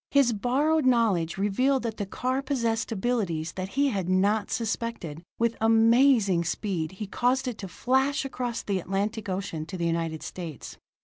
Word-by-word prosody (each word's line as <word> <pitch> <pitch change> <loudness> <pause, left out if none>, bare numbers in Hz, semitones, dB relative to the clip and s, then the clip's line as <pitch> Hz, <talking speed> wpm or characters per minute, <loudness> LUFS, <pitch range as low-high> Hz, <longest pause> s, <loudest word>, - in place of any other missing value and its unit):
His 275 -4 +4
borrowed 285 +8 +1
knowledge 220 -10 +2
revealed 250 +7 +1
that 225 -2 -3
the 205 - -3
car 255 +6 -1
possessed 235 -5 -1
abilities 190 -8 -1
that 185 0 -5
he 280 0 +4
had 195 -7 -2
not 200 +3 +2
suspected; 225 -9 -3 0.2
with 230 0 +1
amazing 225 -4 +4
speed 175 -1 -2
he 210 +3 -5
caused 250 +6 0
it 245 -4 -4
to 195 - -5
flash 265 +9 +1
across 245 -3 -3
the 195 -2 -1
Atlantic 200 +4 -2
Ocean 185 -4 -3
to 185 - -6
the 170 - -1
United 165 -1 -1
States. 165 -7 -7
220 Hz, 165 wpm, -27 LUFS, 185-250 Hz, 0.2 s, His